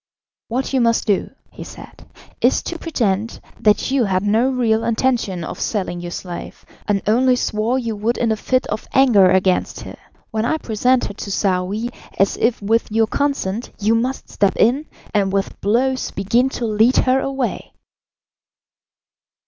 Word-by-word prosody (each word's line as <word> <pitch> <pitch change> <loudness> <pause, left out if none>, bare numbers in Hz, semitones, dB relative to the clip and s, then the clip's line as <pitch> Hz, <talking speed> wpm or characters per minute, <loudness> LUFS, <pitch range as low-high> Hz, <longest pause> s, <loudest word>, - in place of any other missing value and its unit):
"What 255 +4 -2
you 260 - +3
must 230 -1 +2
do," 205 -3 +1 0.2
he - - -9
said, - - -13 0.3
"is - - +3
to 340 - -5
pretend 225 - -1 0.2
that 210 +4 +2
you 270 -4 +2
had 185 -1 0
no 220 +5 +2
real 230 -4 +1
intention 230 -6 0
of - - -6
selling 185 -5 -2
your 175 - -5
slave, 175 0 -7 0.2
and 200 -2 0
only 250 +4 +3
swore 225 +1 0
you 230 -4 -2
would 220 +4 -1
in 230 -2 +1
a - - +2
fit 255 +4 0
of 215 - -5
anger 230 -9 +6
against 190 0 +1
her. - - -9 0.3
When 220 0 -1
I 315 +7 +1
present 245 0 +1
her - - -5
to 200 - -7
Saouy 195 +4 -1 0.3
as 195 - +2
if 230 +1 +1
with 225 +2 +1
your 225 +1 +3
consent 240 -4 -2
you 210 +2 +2
must 250 +4 -1
step 200 -1 +1
in, 265 +7 +2 0.3
and 200 -2 +1
with 195 0 -2
blows 255 +5 +1
begin 235 +7 +1
to 240 - -2
lead 220 +3 +3
her 260 +1 +3
away." 270 -2 -3
225 Hz, 165 wpm, -20 LUFS, 200-255 Hz, 0.3 s, anger